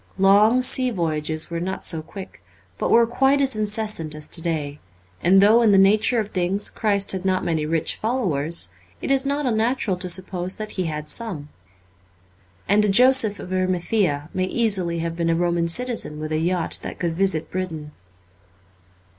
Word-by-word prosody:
Long 210 +6 +4
sea 255 0 +3
voyages 160 -5 -3
were 170 - -3
not 185 +2 -5
so 165 -2 +1
quick, 185 - -11 0.4
but - - -1
were 235 0 +5
quite 270 +4 +2
as 270 -3 +1
incessant 210 -7 -1
as 150 0 -3
to 165 - 0
day; 150 -4 -3 0.4
and 190 +2 +5
though 215 +4 +5
in 225 - +4
the 195 - +5
nature 210 +5 +3
of 210 -2 -3
things 190 +2 -1
Christ 200 -2 0
had 190 -1 -3
not 185 -1 0
many 160 -3 -1
rich 165 0 -1
followers, 170 - -1 0.3
it - - -3
is 275 0 +2
not 285 +1 -1
unnatural 225 -4 0
to 180 0 -2
suppose 185 0 -2
that 215 -1 -6
He 185 - -3
had 150 -1 -5
some. 170 -9 -4 1.2
And 210 +1 +3
a 210 - +1
Joseph 240 -1 +4
of 185 - -7
Arimathea 185 -4 -1
may 185 - -1
easily 190 -6 -1
have 165 0 -3
been 170 -1 -1
a 165 - +2
Roman 170 0 0
citizen 225 -5 0
with 155 0 -5
a 155 - 0
yacht 175 +1 -1
that - - -7
could 170 -2 -2
visit 185 -3 0
Britain. 165 -5 -5
185 Hz, 180 wpm, -22 LUFS, 165-215 Hz, 1.2 s, were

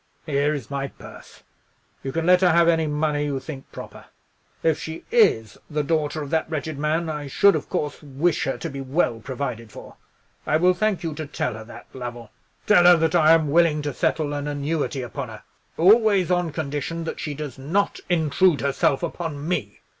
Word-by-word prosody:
Here 145 -1 +1
is 140 -2 -7
my 140 0 -2
purse. - - -14 0.6
You 135 - -4
can 165 +3 -2
let 180 +1 +5
her 180 - +5
have 170 0 +4
any 165 -2 +3
money 150 0 0
you 140 -2 -2
think 135 -1 -9
proper. - - -10 0.6
If 160 -2 +2
she 160 0 -7
is 110 - +3
the 150 -1 -1
daughter 155 0 -1
of 140 - -8
that 160 -1 0
wretched 155 -2 -4
man, 155 +3 0
I 150 -2 -4
should, 200 +8 +4
of - - -4
course, 150 -5 -3
wish 150 +4 0
her - - -2
to 165 - -5
be 140 0 -6
well 135 -3 0
provided 125 -3 -5
for. - - -12 0.5
I 155 - +3
will 180 +3 +4
thank 195 -2 0
you 165 -2 -2
to 155 0 -6
tell 125 -4 -2
her 110 0 -8
that, - - -12
Lovell. 120 -3 -7 0.3
Tell 180 -4 +5
her 175 -1 +8
that 160 +1 +1
I 160 -2 +6
am 160 -3 +2
willing 160 -2 +3
to 145 -1 -3
settle 145 +3 0
an 145 0 -3
annuity 145 -1 -2
upon 120 - -6
her; - - -11 0.3
always 200 0 +4
on 175 -2 +1
condition 150 +2 -3
that 160 - -5
she 150 -2 -4
does 145 -3 -7
not 175 +10 0
intrude 165 0 +2
herself 140 +1 +1
upon 160 -3 -4
me. 140 - -3
155 Hz, 200 wpm, -23 LUFS, 140-170 Hz, 0.6 s, her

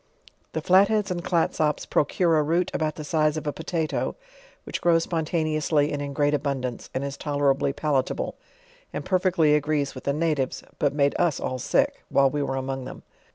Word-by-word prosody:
The - - -3
Flatheads 200 +2 +4
and 175 -1 -3
Clatsops 160 -4 +1
procure 165 +2 +2
a - - +4
root 165 +4 +1
about 155 -1 -1
the 155 - -6
size 155 0 +1
of 155 - -5
a 145 - -1
potatoe, 160 +1 -2 0.5
which - - -5
grows 165 -1 +4
spontaneously 155 -2 0
and 145 - -2
in 140 0 -4
great 145 +1 +1
abun 140 -2 -1
dance, 125 -2 -5
and 130 - -1
is 140 0 -4
tolerably 145 -2 +1
palatable, 140 -2 -1 0.6
and - - -5
perfectly 180 -5 +3
agrees 150 -1 +1
with 130 - -10
the 140 - +1
natives; 150 -4 -1 0.2
but 145 -4 +2
made 140 -1 +2
us 165 -5 +2
all 130 - -3
sick, - - +1
while 135 -1 +4
we 150 - -1
were 135 -1 -1
among 135 0 -3
them. - - -9
150 Hz, 185 wpm, -25 LUFS, 140-165 Hz, 0.6 s, Flatheads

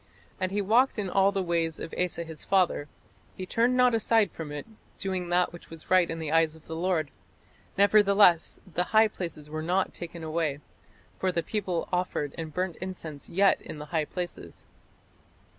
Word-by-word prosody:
"And 185 0 -1
he 205 +1 0
walked 235 +7 +3
in 195 -4 -2
all 195 0 +4
the 195 -2 -1
ways 165 -2 -1
of 165 - -7
Asa 180 -1 -1
his 160 -2 -8
father; 180 -6 +2 0.5
he 185 - -4
turned 240 +6 +2
not 250 -1 +5
aside 225 -3 +3
from 155 -3 -7
it, 145 -1 -5 0.3
doing 185 -2 -3
that 175 0 +2
which 175 - -12
was 165 +1 -11
right 185 -2 +5
in 165 - -3
the 160 -2 -4
eyes 160 -1 +3
of 160 - -18
the 160 - -6
Lord: 165 -4 0 0.7
nevertheless 200 -3 +5
the 180 -1 -2
high 220 0 +7
places 165 -7 -6
were 155 +1 -4
not 180 +4 0
taken 170 -1 -8
away; 155 -2 -1 0.6
for 185 - +1
the 170 -2 -1
people 185 -5 -2
offered 180 -5 -1
and 160 -2 -5
burnt 180 0 -2
incense 165 -6 -7
yet 195 +3 +3
in - - -8
the 150 - -7
high 160 -2 +1
places." 175 +2 -7
175 Hz, 185 wpm, -28 LUFS, 160-195 Hz, 0.7 s, high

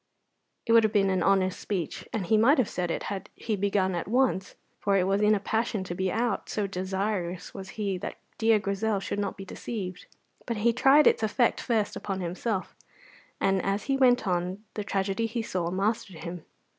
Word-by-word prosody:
It - - 0
would 230 0 +7
have 220 - +2
been 195 -2 +3
an 185 -1 +1
honest 190 0 +2
speech, 185 -5 -4
and 210 -5 -2
he 220 - +3
might 235 +8 +5
have 255 -6 +3
said 180 -1 -2
it - - -2
had 195 -2 -5
he 220 - -2
begun 195 -1 +1
at 175 0 -3
once, 235 -4 +1 0.2
for 200 -1 +2
it 185 - +3
was 195 +2 +1
in 210 0 +5
a - - 0
passion 220 0 -1
to 180 - -5
be 190 +1 -1
out, 230 -1 -1
so 210 - -1
desirous 190 -1 -3
was 195 -1 -8
he 200 -4 -1
that - - -5 0.2
dear 225 -1 +5
Grizel 200 +1 -1
should 200 - -3
not 200 -1 -2
be 195 - -7
deceived; 185 -2 -6 0.4
but 235 -2 -2
he 230 +3 +3
tried 275 +5 +6
its - - +4
effect 230 +2 +2
first 220 -4 0
upon 195 -2 -4
himself, 185 +3 -3 0.6
and 195 -1 +2
as 195 +1 0
he 275 - 0
went 250 -3 +4
on 180 +3 -1
the 210 - -3
tragedy 195 +2 -1
he 230 0 -3
saw 175 -5 -2
mastered 195 -3 -2
him. 170 -1 -6
200 Hz, 205 wpm, -28 LUFS, 190-220 Hz, 0.6 s, would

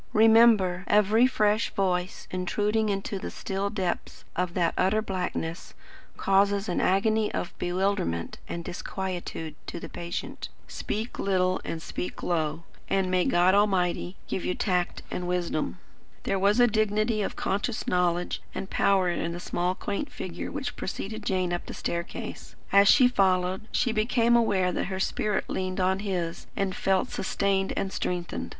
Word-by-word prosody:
Remember, 220 -4 +5
every 210 +4 +5
fresh 215 -3 +2
voice 185 -3 -1
intruding 210 +4 0
into 195 0 -2
the - - -5
still 195 +1 -3
depths 190 -4 -3
of 180 -1 -1
that 170 -2 +2
utter 190 +4 +2
blackness, 180 -4 -4 0.4
causes 200 +1 +2
an 175 - 0
agony 215 +3 +2
of - - -3
bewilderment 175 - -1
and 170 0 -5
disquietude 175 -4 -4
to - - -5
the - - -7
patient. 170 0 -5 0.2
Speak 220 +3 -4
little 185 -1 +1
and 160 -1 -5
speak 180 - -5
low, 160 -2 -1 0.3
and 190 -1 +1
may 185 -1 +3
God 175 +2 +4
Almighty 190 -3 +2
give 185 - -3
you 180 - -1
tact 180 -3 -1
and 180 - -3
wisdom." 170 - -1 0.5
There 195 - 0
was 200 +4 +3
a 245 - +8
dignity 215 0 +1
of - - -2
conscious 205 +4 -1
knowledge 180 -1 0
and 195 - -5
power 195 -2 +3
in 170 -1 -1
the 175 - -5
small 180 +1 -1
quaint 205 +9 -3
figure 175 -2 -5
which 275 -3 -4
preceded 215 +3 -5
Jane 185 -2 0
up 175 - -3
the - - -6
staircase. 170 +1 -5 0.2
As 200 0 +6
she 255 +3 +7
followed, 190 -3 +1
she 245 - +1
became 230 +2 +3
aware 195 -6 +3
that - - -1
her 190 0 -4
spirit 210 +1 0
leaned 185 0 -2
on 190 +1 +2
his 180 -5 -3
and 195 -2 -1
felt 190 -1 +1
sustained 195 0 0
and 190 - -2
strengthened. 175 -1 -3
190 Hz, 155 wpm, -27 LUFS, 180-210 Hz, 0.5 s, a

